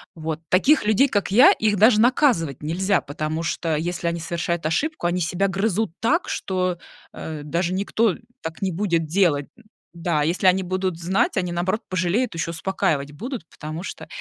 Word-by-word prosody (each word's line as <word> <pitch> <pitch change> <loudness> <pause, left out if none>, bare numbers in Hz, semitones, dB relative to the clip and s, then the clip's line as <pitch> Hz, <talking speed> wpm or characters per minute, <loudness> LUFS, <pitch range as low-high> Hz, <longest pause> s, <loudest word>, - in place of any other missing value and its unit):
Вот 160 0 -4
таких 235 +7 +4
людей, 220 +6 +4
как 205 -5 -1
я, 260 - +8
их 215 - +1
даже 215 +1 +6
наказывать 235 - +2
нельзя, 190 +5 +1
потому 155 +3 -4
что 165 -1 -1
если 170 +2 -2
они 170 0 -1
совершают 170 0 -3
ошибку, 285 - -1
они 180 +1 0
себя 180 +4 0
грызут 195 0 0
так, 330 +10 +1
что, 185 -2 -2 0.3
э, 155 -2 -6
даже 170 +4 -1
никто, 205 +1 +1
э, - - -10 0.2
так 160 +2 -7
не 190 - 0
будет 170 -3 0
делать, 155 -4 +2
м. 235 - -19 0.3
Да, 170 -3 -1
если 170 +5 0
они 185 +1 +5
будут 185 -1 -2
знать, 195 - +1
они, 180 -1 -1
наоборот, 185 +6 -1
пожалеют, 185 +4 0
ещё 165 0 -2
и - - -8
успокаивать 160 -4 -1
будут, 235 - -6
потому 155 +2 -7
что - - -8
180 Hz, 180 wpm, -23 LUFS, 165-205 Hz, 0.3 s, я